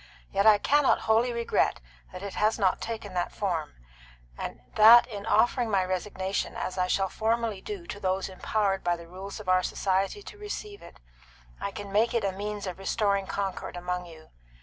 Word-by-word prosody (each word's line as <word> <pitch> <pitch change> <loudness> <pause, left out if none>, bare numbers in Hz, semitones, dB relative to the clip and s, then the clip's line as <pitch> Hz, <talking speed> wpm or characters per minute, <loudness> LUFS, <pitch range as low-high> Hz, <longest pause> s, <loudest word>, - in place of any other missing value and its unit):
Yet 200 +2 +2
I 215 -1 +8
cannot 290 +6 +3
wholly 225 +3 +2
regret 235 0 +1 0.3
that 185 +1 -8
it 200 - -5
has 215 +1 +1
not 195 -4 +1
taken 220 -4 -5
that 175 -1 -1
form, 170 -7 -2 0.6
and - - -6
that 225 +3 +9
in 210 -3 -7
offering 240 0 +3
my 195 -3 +2
resignation, 190 +1 -2
as 185 - -3
I 180 -1 +1
shall 195 +1 +1
formally 225 0 -1
do 400 -5 -6
to 205 - -7
those 190 -1 -1
empowered 195 +1 -1
by 175 0 +2
the 170 0 -11
rules 190 +4 -8
of 210 - -10
our 185 0 +4
society 195 - -1
to 415 - -11
receive 415 0 -6
it, - - -14 0.6
I - - -2
can 200 -1 -8
make 225 +4 +2
it 230 - +1
a 195 - +1
means 205 +1 -5
of 185 0 -6
restoring 200 0 0
concord 195 -2 -4
among 180 0 -3
you. 160 -2 -14
200 Hz, 190 wpm, -28 LUFS, 185-225 Hz, 0.6 s, that